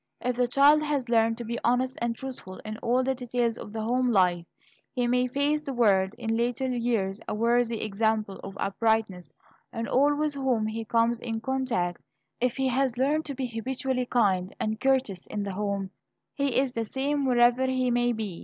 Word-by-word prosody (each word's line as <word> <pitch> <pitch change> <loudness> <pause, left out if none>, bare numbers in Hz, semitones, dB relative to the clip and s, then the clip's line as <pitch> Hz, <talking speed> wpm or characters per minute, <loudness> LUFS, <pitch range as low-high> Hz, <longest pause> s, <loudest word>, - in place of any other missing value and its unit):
If 250 -1 -2
the 250 -1 +2
child 285 +4 +5
has 290 -5 -1
learned 225 -1 +3
to 240 - -5
be 235 +1 -3
honest 255 +2 +1
and 235 0 0
truthful 245 -8 -7
in 215 0 -5
all 245 +2 +1
the 265 +1 +1
details 245 -2 -1
of - - -8
the 220 0 -4
home 250 +2 +1
life, 180 -4 +2 0.4
he 245 -2 -1
may 250 +1 +2
face 285 +4 0
the 275 -3 -5
world 200 -4 +3
in 225 -2 -2
later 245 +3 0
years 225 -5 -1
a - - -2
worthy 235 +1 +1
example 215 -1 -1
of 195 - -8
uprightness 200 -3 0 0.4
to 230 0 -2
all 290 +3 +4
with 300 0 -1
whom 260 -5 0
he 220 +1 -4
comes 230 +1 +2
in 225 -1 -3
contact. 225 -8 -1 0.4
If 250 0 0
he 265 -1 +1
has 255 -1 0
learned 295 +5 +1
to 280 - -5
be 260 - -2
habitually 255 +2 -2
kind 195 -6 +1
and 220 0 -2
courteous 260 -9 0
in 205 - -3
the 200 -1 -4
home, 200 -1 -2 0.4
he 280 -4 0
is 265 -1 +1
the 230 -2 -2
same 280 +4 -1
wherever 245 0 +4
he 255 -1 +1
may 240 0 +2
be. 215 -6 -4
240 Hz, 195 wpm, -27 LUFS, 220-260 Hz, 0.4 s, child